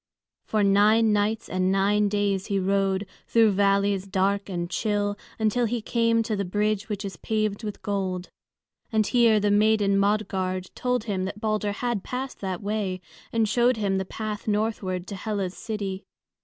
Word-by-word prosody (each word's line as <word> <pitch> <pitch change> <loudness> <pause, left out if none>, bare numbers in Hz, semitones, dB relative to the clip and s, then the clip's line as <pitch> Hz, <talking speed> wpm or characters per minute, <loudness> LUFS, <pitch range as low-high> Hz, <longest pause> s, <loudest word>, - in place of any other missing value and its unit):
For 215 -1 +1
nine 210 +3 +4
nights 210 +2 0
and 185 0 0
nine 205 +2 +2
days 200 -2 0
he 200 -2 0
rode, 195 +1 +1 0.2
through 225 -2 +4
valleys 200 0 +2
dark 195 +1 0
and 175 -2 -2
chill, 205 +1 -1 0.2
until 220 +2 +1
he 235 +1 -1
came 230 0 +1
to 220 -1 -2
the 200 - -1
bridge 210 +3 -1
which 205 -1 -3
is 195 - -6
paved 215 -1 -1
with 210 -1 -6
gold. 190 -3 -2 0.6
And 220 -1 +2
here 230 -2 +4
the 205 0 +1
maiden 205 -1 +3
Modgard 190 -3 -1
told 250 -3 -1
him 195 -4 -2
that 195 +2 -5
Balder 215 -1 -1
had 235 -3 -2
passed 260 +1 -5
that 190 -1 -3
way, 200 -3 -2 0.3
and 225 -1 +2
showed 245 +2 +3
him 195 -3 0
the - - -1
path 210 +2 -5
northward 205 -4 -1
to 200 - -6
Hela's 195 -2 -3
city. 200 -4 -4
205 Hz, 170 wpm, -25 LUFS, 195-220 Hz, 0.6 s, nine